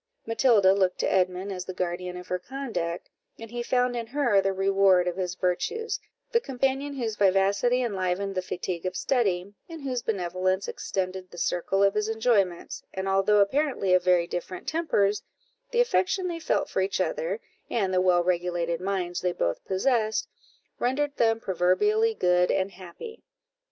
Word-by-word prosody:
Matilda 225 -5 +4
looked 190 -2 +1
to - - +1
Edmund 185 +1 +1
as 180 -1 -5
the 185 - -6
guardian 180 0 -3
of 180 0 -9
her 180 - -1
conduct, 180 -7 -4 0.3
and 225 0 -10
he 240 0 -3
found 250 0 +1
in 235 -1 -3
her 240 -6 +2
the 195 0 +1
reward 195 -1 +3
of 175 - -1
his 180 -2 -3
virtues, 190 - -1 0.3
the 465 - +4
companion 270 - -1
whose 230 -5 -2
vivacity 200 +6 +3
enlivened 195 -2 -1
the 185 - -1
fatigue 180 -1 -4
of 185 - -4
study, 200 -6 0 0.2
and 325 -3 -8
whose 255 -3 -2
benevolence 185 -2 -1
extended 185 -1 -3
the 175 - -13
circle 185 +3 0
of 200 0 +4
his 210 0 -1
enjoyments; 220 -6 0
and 190 0 -4
although 195 +2 +4
apparently 250 -3 +1
of 185 -1 +4
very 180 -1 +4
different 175 +1 -6
tempers, 210 -11 +1 0.5
the 480 0 +3
affection 385 -6 +1
they 340 -2 -4
felt 290 -2 0
for - - -1
each 190 0 -1
other, 185 +3 -1 0.3
and 195 -5 0
the 185 - +3
well 180 -1 +4
regulated 175 -1 -1
minds 185 -2 -2
they 180 - +1
both 85 - -2
possessed, 215 +2 +1 0.5
rendered 285 +3 0
them 225 -1 +3
proverbially 245 - +2
good 180 - +3
and 195 0 0
happy. 190 - -10
195 Hz, 165 wpm, -27 LUFS, 180-240 Hz, 0.5 s, Matilda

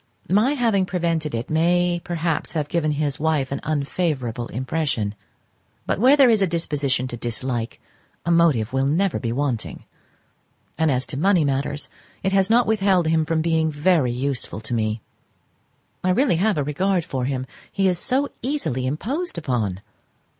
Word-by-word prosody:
My 215 +8 +4
having 220 -8 +2
prevented 165 -6 -1
it 115 +4 -3
may 175 +2 +2
perhaps 165 -2 -2
have 150 -3 -1
given 155 -2 0
his 145 -1 -1
wife 150 -4 0
an 140 - -2
unfavourable 140 -5 -2
impression, 130 -4 -2 0.7
but - - -1
where 260 +6 +6
there 265 -4 +7
is 220 -3 +3
a 195 - +3
disposition 145 -6 0
to 120 - -6
dislike, 120 0 -3 0.5
a 170 - +1
motive 155 -10 +3
will 135 +1 +1
never 175 +6 +1
be 115 -3 -2
wanting; 125 -3 -2 0.9
and 160 -1 +2
as 130 -1 0
to 135 - -3
money 180 -2 +3
matters 140 +1 -1 0.4
it 190 - +1
has 195 0 +3
not 235 +1 +4
withheld 195 -5 +2
him 160 -1 +2
from 160 -1 +1
being 160 -1 +2
very 150 -2 +2
useful 130 -2 -1
to 110 +2 -5
me. 110 -1 -1 1.0
I 185 - +1
really 190 - +3
have 205 +2 +1
a 145 - +1
regard 175 +5 0
for 130 -2 -2
him, 130 -1 -2 0.3
he 195 -1 +1
is 180 -2 +2
so 270 +5 +1
easily 230 - -2
imposed 255 - -3
upon! 110 - -2
155 Hz, 165 wpm, -23 LUFS, 130-185 Hz, 1.0 s, there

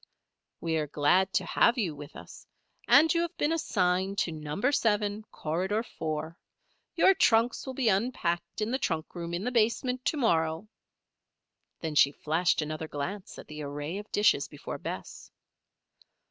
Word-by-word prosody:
"We 165 -1 0
are 150 -1 -1
glad 180 +7 +2
to - - +1
have 240 +2 +3
you 180 -10 -1
with 145 0 -10
us, - - -12 0.4
and 315 +2 +6
you 335 - +2
have 340 -1 -4
been 295 - +1
assigned 190 - 0
to 170 - 0
Number 155 - -1
Seven, 210 -4 +1
Corridor 185 +8 -1
Four. 160 -5 -5 0.6
Your 385 - +6
trunks 235 -5 +2
will 260 - -5
be 255 -3 0
unpacked 190 -4 -1
in 215 +2 -1
the 260 - 0
trunk 160 -10 -2
room 170 -1 -5
in 175 +3 -3
the 250 - -1
basement 245 +2 +1
to 310 - +1
morrow." 165 - +1 1.1
Then 160 -2 -3
she 140 -1 +5
flashed 160 +2 +1
another 155 +1 -5
glance 185 +8 -5
at - - -9
the 150 0 -8
array 145 +5 -4
of 210 - -11
dishes 205 -9 +3
before 145 - -7
Bess. - - -7
185 Hz, 160 wpm, -29 LUFS, 155-230 Hz, 1.1 s, and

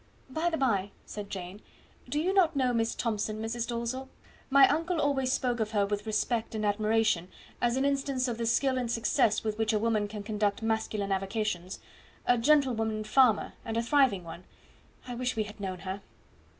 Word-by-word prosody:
"By 320 +5 0
the 325 - -2
by," 205 -8 +1 0.2
said 205 -1 -7
Jane, 190 +1 -7 0.5
"do 295 - 0
you 365 +5 +1
not 350 -5 +4
know 255 -3 +2
Miss 230 0 0
Thomson, 215 -2 -2
Mrs. 225 +1 -3
Dalzell? 240 +3 -3 0.4
My 275 0 +7
uncle 335 +1 0
always 270 -3 +1
spoke 245 -2 0
of 220 0 -2
her 205 -1 +3
with 205 +1 -3
respect 225 +1 -1
and 215 -1 -1
admiration, 215 -3 +2 0.3
as 240 +1 +2
an 265 - +1
instance 275 -2 0
of 235 -1 -3
the 230 - -1
skill 260 +2 +2
and 245 -2 -2
success 230 -1 +2
with 215 0 -3
which 220 0 +1
a - - +3
woman 215 -2 +1
can 205 0 -7
conduct 210 0 -1
masculine 220 -2 -1
avocations. 195 -2 -2 0.5
A 245 -1 +3
gentlewoman 230 -6 +2
farmer, 225 0 +3
and 225 0 -3
a 230 - +1
thriving 245 -7 +3
one. 170 +2 -10 0.6
I 245 - -4
wish 250 +1 -2
we 220 - +1
had 210 0 -11
known 185 -3 -4
her." 190 +1 -5
225 Hz, 190 wpm, -29 LUFS, 210-255 Hz, 0.6 s, My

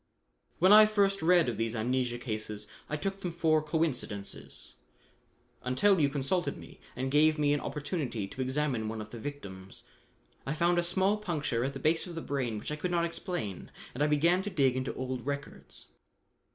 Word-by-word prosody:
"When 185 +4 +6
I 215 0 +10
first 200 -2 +2
read 175 -2 +5
of 115 -4 -2
these 115 +1 -1
amnesia 120 +2 0
cases, 110 -3 -4 0.2
I 150 - -1
took 195 +4 -3
them 180 -3 -3
for 160 -2 +2
coincidences 150 -10 -3 0.9
until 180 +10 +3
you 145 -2 +4
consulted 145 +6 -1
me - - -13 0.2
and 130 +2 -2
gave 155 +2 +5
me 145 -1 +3
an 145 - +1
opportunity 145 - -3
to 130 - -6
examine 130 -4 0
one 110 0 -4
of 105 0 -8
the 120 - -7
victims. 100 -9 -8 0.6
I 135 - -2
found 175 +2 +3
a - - +4
small 190 +4 +2
puncture 150 - -1
at 135 +1 -2
the - - -4
base 160 +6 +1
of 175 - -7
the 165 - -4
brain 130 -7 -2
which 105 - -5
I 150 - -2
could 180 +4 -2
not 170 -1 +2
explain, 165 - -4 0.2
and 125 - -5
I 150 - +4
began 165 +5 +3
to 205 - -3
dig 135 -8 +2
into 130 0 -1
old 130 -1 -4
records. 140 +1 -6
145 Hz, 190 wpm, -30 LUFS, 125-170 Hz, 0.9 s, I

